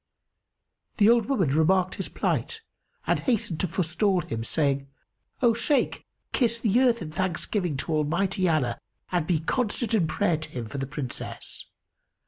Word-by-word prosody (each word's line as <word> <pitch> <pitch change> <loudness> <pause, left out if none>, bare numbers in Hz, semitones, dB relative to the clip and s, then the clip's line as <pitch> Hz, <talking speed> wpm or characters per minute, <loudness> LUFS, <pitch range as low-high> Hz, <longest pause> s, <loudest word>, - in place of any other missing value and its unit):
The 205 - +5
old 235 -2 +3
woman 200 - +2
remarked 180 +6 +3
his - - -4
plight 450 -1 -2 0.4
and - - +2
hastened 205 - -1
to 185 - +1
forestall 180 +3 +1
him, 115 -10 -4
saying 140 +1 0 0.6
"O 235 -1 +6
Shaykh, 280 +5 0 0.3
kiss 235 -3 +2
the 225 +1 +3
earth 240 -6 +3
in 155 - -7
thanksgiving 180 -1 -1
to 160 - -2
Almighty 175 +5 +1
Allah 130 -7 +1 0.3
and 175 -4 0
be 165 -4 +1
constant 230 +4 -1
in 190 -7 +3
prayer 175 0 +1
to 155 0 -6
Him 125 -5 -5
for 135 +6 -6
the 135 - -3
Princess. 140 -3 -5
175 Hz, 155 wpm, -26 LUFS, 155-215 Hz, 0.6 s, O